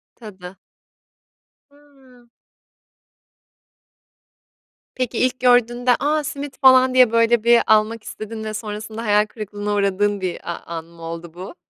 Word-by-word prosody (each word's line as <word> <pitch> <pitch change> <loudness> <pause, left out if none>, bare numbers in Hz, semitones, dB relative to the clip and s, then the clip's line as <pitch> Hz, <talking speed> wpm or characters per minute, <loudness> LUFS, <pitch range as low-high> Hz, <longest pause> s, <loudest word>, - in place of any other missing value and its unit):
Tadı. 190 -5 -12 1.1
Hıı. 270 -4 -23 2.7
Peki, 250 -2 -3
ilk 255 0 0
gördüğünde, 245 0 +3
"A, 300 +1 0
simit 280 0 -7
falan." 260 -1 +6
diye, 255 -3 +5
böyle, 230 0 +2
bir 235 0 +5
almak 215 +1 +2
istedin 220 +1 -8
ve 215 0 -5
sonrasında 215 +1 -6
hayal 210 0 +3
kırıklığına 210 -1 -6
uğradığın 200 0 0
bir 180 -1 -4
a - - -4
an 165 -1 -7
mı 170 0 -18
oldu 165 0 -8
bu? 185 - -10
220 Hz, 125 wpm, -20 LUFS, 205-250 Hz, 2.7 s, falan